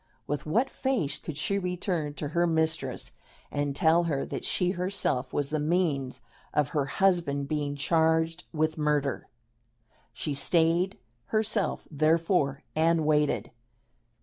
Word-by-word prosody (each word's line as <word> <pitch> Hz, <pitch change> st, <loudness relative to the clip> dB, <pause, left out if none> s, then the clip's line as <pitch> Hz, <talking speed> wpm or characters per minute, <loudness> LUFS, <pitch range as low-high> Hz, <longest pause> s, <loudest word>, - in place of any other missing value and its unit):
With 145 Hz, +1 st, -3 dB
what 230 Hz, -, +2 dB
face 225 Hz, -, -1 dB
could 150 Hz, -, -7 dB
she 200 Hz, +6 st, 0 dB
return 180 Hz, -5 st, -2 dB
to 145 Hz, -, -4 dB
her 170 Hz, +3 st, +2 dB
mistress 160 Hz, -5 st, 0 dB, 0.4 s
and 145 Hz, -1 st, -1 dB
tell 165 Hz, +3 st, +4 dB
her 145 Hz, -5 st, -1 dB
that -, -, -5 dB
she 180 Hz, -1 st, +1 dB
herself 180 Hz, -7 st, -1 dB
was 145 Hz, 0 st, -1 dB
the 155 Hz, -, 0 dB
means 145 Hz, -6 st, 0 dB, 0.3 s
of 150 Hz, -1 st, +2 dB
her 145 Hz, -2 st, 0 dB
husband 145 Hz, -3 st, +1 dB
being 145 Hz, -1 st, -2 dB
charged 160 Hz, +3 st, +1 dB
with 155 Hz, 0 st, 0 dB
murder? 150 Hz, -2 st, 0 dB, 0.8 s
She 150 Hz, -, -3 dB
stayed 170 Hz, +6 st, +2 dB, 0.3 s
herself, 215 Hz, -2 st, 0 dB
therefore, 155 Hz, -2 st, +2 dB
and 160 Hz, 0 st, +3 dB
waited. 150 Hz, -1 st, +1 dB
160 Hz, 130 wpm, -28 LUFS, 145-175 Hz, 0.8 s, tell